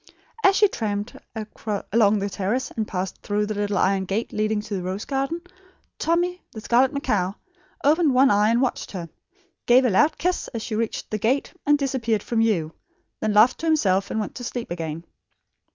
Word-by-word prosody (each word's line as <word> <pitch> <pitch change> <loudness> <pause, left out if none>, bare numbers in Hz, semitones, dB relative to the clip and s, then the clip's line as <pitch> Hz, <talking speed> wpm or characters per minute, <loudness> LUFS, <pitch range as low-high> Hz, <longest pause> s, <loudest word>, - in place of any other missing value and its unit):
As 390 0 +6
she 415 - +5
tramped 210 - -3 0.8
along 215 -2 +4
the 200 0 -1
terrace 215 +8 -2
and 220 -2 -3
passed 185 0 -4
through 210 0 0
the 215 - -3
little 205 -1 -1
iron 190 0 +2
gate 200 +5 -2
leading 215 0 0
to 210 - -7
the 190 - -2
rose 185 +3 -4
garden, 275 +5 -2 0.6
Tommy, 350 +2 0
the 220 - -7
scarlet 245 +5 +3
macaw, 215 -11 0 0.5
opened 300 -1 +3
one 265 +2 +6
eye 205 +1 +4
and 235 +3 +3
watched 255 - -2
her; 170 -3 -5 0.6
gave 255 +2 +6
a 245 - +3
loud 295 +11 +3
kiss 360 +1 -1
as 225 - -3
she - - -5
reached 225 +1 -3
the 215 - -1
gate 255 +7 0
and 295 0 +5
disappeared 250 -6 -1
from 235 - -1
view, 180 -9 +1 0.5
then 215 - 0
laughed 215 +4 +5
to 330 - -3
himself 195 -12 +2
and 220 - -2
went 210 - -3
to 245 - -8
sleep 240 -3 -5
again. 165 -1 -4
220 Hz, 190 wpm, -24 LUFS, 200-265 Hz, 0.8 s, As